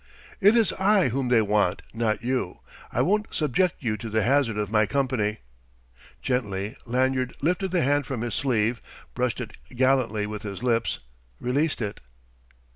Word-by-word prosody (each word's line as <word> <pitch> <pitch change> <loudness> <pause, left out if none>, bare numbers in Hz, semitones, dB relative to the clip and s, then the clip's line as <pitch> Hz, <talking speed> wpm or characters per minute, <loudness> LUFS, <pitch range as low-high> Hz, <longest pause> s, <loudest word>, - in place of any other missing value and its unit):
"It 205 +2 +6
is 225 -5 +3
I 195 -5 +4
whom 130 +2 -1
they 120 -3 +4
want, 105 -3 +1
not 115 -1 -1
you. 125 -7 -2 0.3
I - - +1
won't 210 +3 +1
subject 155 +4 +1
you 110 -3 0
to 115 - -6
the 110 0 +1
hazard 125 -2 +2
of 105 -1 -2
my 110 -1 +3
company." 125 -6 0 0.8
Gently 105 -4 -1
Lanyard 130 +1 0
lifted 180 +4 +1
the 180 -1 +1
hand 145 +1 +1
from 130 -5 -3
his 120 -1 -3
sleeve, 115 -3 +1 0.3
brushed 125 0 -1
it 125 - -6 0.2
gallantly 125 -5 +2
with 105 0 -5
his 100 0 -6
lips, 115 - +1 0.4
released 140 +1 0
it. 100 -1 -5
125 Hz, 160 wpm, -26 LUFS, 110-140 Hz, 0.8 s, It